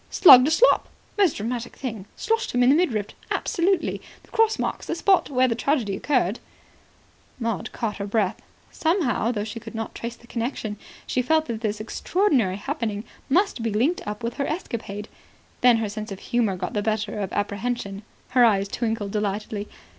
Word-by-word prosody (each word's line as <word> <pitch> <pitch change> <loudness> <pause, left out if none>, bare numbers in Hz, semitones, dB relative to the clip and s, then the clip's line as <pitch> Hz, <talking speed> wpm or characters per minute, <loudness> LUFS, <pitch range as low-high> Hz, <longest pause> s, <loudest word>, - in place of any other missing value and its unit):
"Slugged 260 -7 +9
a - - +3
slop. 440 +10 +4 0.3
Most 390 -7 +3
dramatic 235 +3 -4
thing. 220 -7 -6
Sloshed 450 0 -1
him 245 0 +3
in 245 - +5
the - - +5
midriff. 235 - +1 0.2
Absolutely. 370 +2 0 0.2
The - - -23
cross 445 0 +3
marks - - -3
the - - -1
spot 380 0 +3
where 255 -2 +3
the 235 - +1
tragedy 235 -5 0
occurred." 240 -3 0 1.0
Maud 230 -7 -2
caught 215 -3 -3
her 200 0 -4
breath. 205 -2 0 0.3
Somehow, 315 - +1
though 210 -4 -2
she 220 +2 -6
could 225 - -10
not 225 0 -4
trace 235 0 -5
the 240 - -19
connection, 230 -3 -3 0.3
she 255 - 0
felt 315 +5 +2
that 230 -4 -4
this 215 -2 -2
extraordinary 240 - +1
happening 220 -4 -3 0.3
must 355 - +2
be 225 - 0
linked 260 - +1
up 210 +3 -5
with 235 0 -3
her 280 - -1
escapade. 225 - -4 0.5
Then 245 -2 +6
her 225 -1 -1
sense 210 0 -6
of 195 - -5
humour 230 -3 0
got 180 - -4
the 210 - 0
better 215 0 -1
of 195 -2 -3
apprehension. 205 0 -2 0.3
Her 250 -1 +4
eyes 200 -4 +4
twinkled 220 -2 -2
delightedly. 210 0 -2
230 Hz, 180 wpm, -24 LUFS, 210-270 Hz, 1.0 s, Slugged